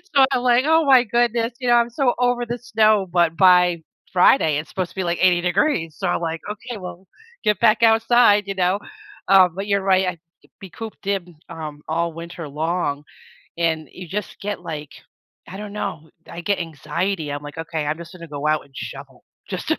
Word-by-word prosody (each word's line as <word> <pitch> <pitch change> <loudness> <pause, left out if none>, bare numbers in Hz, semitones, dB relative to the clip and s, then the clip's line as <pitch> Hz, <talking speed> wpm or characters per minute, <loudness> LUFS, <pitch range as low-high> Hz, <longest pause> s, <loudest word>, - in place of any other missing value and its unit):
So 270 -1 +7
I'm 245 - +1
like, 245 +1 +3
"Oh 320 -1 +4
my 260 -3 +6
goodness." 235 0 0
You 250 - -4
know, - - +6
I'm 235 0 +3
so 245 0 +1
over 245 -1 +1
the 240 +1 -4
snow, 215 -4 +2
but 170 -2 +2
by 180 -2 +5 0.3
Friday, 175 - +4
it's 155 0 -5
supposed 185 -2 -3
to - - -19
be 190 - -2
like 170 0 -1
80 180 -2 +4
degrees. 175 - 0
So, 190 - -2
I'm 175 - 0
like, 165 -1 -3
"Okay, 220 +2 -6
well, 185 0 -9 0.4
get 210 -1 +1
back 230 0 +4
outside." 225 -2 +5
You 195 - -3
know, 185 +2 +1 0.5
uh, 190 -2 +6
but 195 +4 -6
you're 200 -1 +1
right. 190 -1 +2
I 175 -3 -3 0.4
be 190 - -9
cooped 220 +4 -9
in, 180 -4 -2
um, 150 -2 -7
all 170 +1 -1
winter 170 -1 -8
long 150 -1 -2 0.6
and 160 -2 0
you 180 -1 -9
just 205 +5 -5
get 205 0 -4
like, 150 -3 -7 0.6
I 190 - -8
don't 210 0 -7
know, 180 -7 -5 0.2
I 170 - -7
get 200 +3 0
anxiety. 165 +1 -3
I'm 145 0 -4
like, 145 +2 -9
"Okay, 160 -2 -3
I'm 155 +2 -1
just 170 +2 -10
gonna 170 -2 -11
go 145 0 -4
out 155 0 +1
and 135 -1 -21
shovel 135 -2 -9 0.2
just - - -5
to - - +1
185 Hz, 205 wpm, -21 LUFS, 165-215 Hz, 0.6 s, So